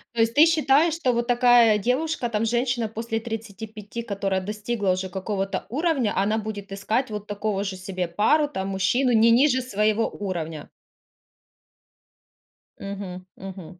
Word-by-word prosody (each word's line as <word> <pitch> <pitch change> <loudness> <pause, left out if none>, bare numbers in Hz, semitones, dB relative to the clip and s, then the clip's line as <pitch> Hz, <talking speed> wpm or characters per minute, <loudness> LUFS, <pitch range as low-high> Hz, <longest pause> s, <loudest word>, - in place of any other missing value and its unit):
То - - -4
есть, 225 0 +3
ты 300 +5 +7
считаешь, 315 -1 +3
что 265 -7 0
вот 235 0 -1
такая 240 -3 +5
девушка, 255 +6 -1
там, 215 0 0
женщина 240 0 0
после 225 +1 -3
35, 220 0 -7
которая 195 -3 -2
достигла 210 0 -2
уже 185 +1 -1
какого-то 195 0 -3
уровня, 280 -5 0
она 210 +3 +1
будет 205 -2 -6
искать 225 +6 -1
вот 210 -1 -6
такого 205 -1 -2
же 195 -2 -4
себе 185 -2 -4
пару, 285 - +2
там, 190 -6 -4
мужчину 240 +7 +1
не 230 +1 +5
ниже 260 +1 +4
своего 215 -2 0
уровня? 165 -6 -5 2.1
Мгм, 195 -2 -7
мгм. 185 -2 -10
215 Hz, 145 wpm, -24 LUFS, 195-245 Hz, 2.1 s, ты